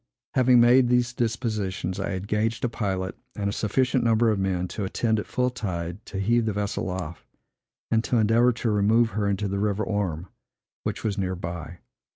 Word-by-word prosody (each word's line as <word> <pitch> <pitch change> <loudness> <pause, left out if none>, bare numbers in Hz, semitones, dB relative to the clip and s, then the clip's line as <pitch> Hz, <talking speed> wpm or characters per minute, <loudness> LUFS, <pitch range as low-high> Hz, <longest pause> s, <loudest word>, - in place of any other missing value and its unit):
Having 125 -1 +5
made 120 +1 +6
these 125 0 +2
dispositions, 110 -6 -2
I - - -2
engaged 105 +5 -1
a - - 0
pilot 95 -5 -2 0.2
and 100 -1 -2
a 100 - -1
sufficient 125 +4 +1
number 115 0 +3
of 105 - 0
men, 90 -2 0
to 105 - -4
attend, 110 +3 0
at - - -5
full 125 0 0
tide, 90 -5 -4
to 100 - -6
heave 115 +3 +2
the 110 - 0
vessel 100 -1 -2
off, 90 -2 -5 0.7
and 115 0 +3
to 125 - +1
endeavor 115 +3 +4
to 115 -1 -1
remove 110 +3 +3
her 100 +1 -1
into 100 +1 0
the 100 0 -2
river 105 0 0
Orme, 95 -7 -2 0.6
which - - -4
was 105 -2 -1
near 95 -1 -1
by. 85 0 -7
105 Hz, 190 wpm, -25 LUFS, 95-115 Hz, 0.7 s, made